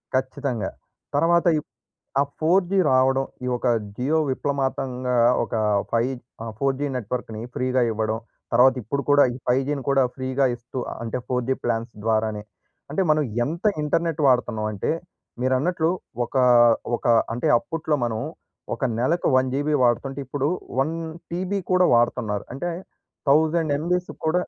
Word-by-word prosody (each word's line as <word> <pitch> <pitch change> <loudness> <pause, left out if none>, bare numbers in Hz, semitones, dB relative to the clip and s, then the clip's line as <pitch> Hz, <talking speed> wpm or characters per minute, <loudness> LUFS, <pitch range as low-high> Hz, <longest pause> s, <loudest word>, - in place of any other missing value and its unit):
ఖచ్చితంగా. 130 -2 -1 0.5
తర్వాత 170 +1 +3
ఇ - - -1 0.6
ఆ - - +5 0.2
4జీ 180 +4 +2
రావడం. 135 +1 +3 0.2
ఈ - - -2
ఒక 125 - -4 0.3
'జియో' 150 +6 +1
విప్లమాతంగా 130 -2 -1 0.3
ఒక - - -7 0.4
5 120 +3 +1 0.3
ఆహ్, 115 -1 -5
4జీ 135 +2 0
నెట్‌వర్క్‌ని 115 -1 -4
ఫ్రీగా 130 0 +1
ఇవ్వడం. 110 0 -1 0.3
తర్వాత 125 +2 +6
ఇప్పుడు 140 +7 -2
కూడా 145 0 +7
ఈ - - -6
5జీని 135 +3 +1
కూడా 135 -1 +4
ఫ్రీగా 130 +1 0
ఇస్తూ 120 +2 -8 0.2
అంటే 115 +2 -3
4జీ 125 +1 0
ప్లాన్స్ 115 0 -1
ద్వారానే. 110 -1 0 0.5
అంటే 195 - +1
మనం 155 0 +4 0.2
ఎంత 170 - -5 0.2
ఇంటర్నెట్ 160 +1 0
వాడుతున్నాం 120 -4 +2
అంటే, 100 - -2 0.5
మీరన్నట్లు 155 +6 +1 0.3
ఒక 120 - -7 0.6
ఒక - - -7 0.3
అంటే 120 - -1
అప్పట్లో 160 +1 -2
మనం 110 -2 -2 0.5
ఒక 135 - -3
నెలకు 160 +8 +1
1జీబీ 135 +4 +1
వాడుతుంటే 135 +3 0
ఇప్పుడు 140 +2 -1 0.3
1టీబీ 165 +5 -3
కూడా 185 0 +4
వాడుతున్నారు. 120 -3 +1
అంటే 175 +7 -3 0.6
1000ఎంబీస్ 160 +3 +2
కూడ 160 +2 +1
135 Hz, 125 wpm, -24 LUFS, 120-155 Hz, 0.6 s, కూడా